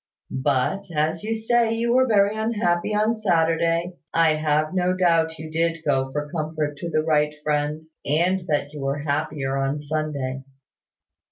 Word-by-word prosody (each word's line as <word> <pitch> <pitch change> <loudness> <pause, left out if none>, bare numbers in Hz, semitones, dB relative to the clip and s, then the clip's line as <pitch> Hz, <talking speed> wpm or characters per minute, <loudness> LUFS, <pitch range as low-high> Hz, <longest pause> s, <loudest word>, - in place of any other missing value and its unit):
But, 145 +9 +1
as 155 +2 0
you 225 +1 -1
say 225 0 +2
you 235 +1 +1
were 260 +1 +4
very 205 -2 +3
unhappy 215 -4 0
on 215 +2 +2
Saturday, 170 -3 +1
I 165 -1 +4
have 155 +1 0
no 180 0 +1
doubt 165 -3 +2
you 155 0 -8
did 165 0 -1
go 135 -2 +1
for 150 +1 -3
comfort 155 -2 -3
to 170 +4 -5
the 155 -1 +1
right 150 -1 +2
Friend, 150 +1 -1 0.2
and 175 +6 +1
that 145 -1 -1
you 150 - -7
were 135 +1 -1
happier 140 -2 -1
on 135 +1 0
Sunday. 145 -3 -3
160 Hz, 160 wpm, -23 LUFS, 150-185 Hz, 0.2 s, were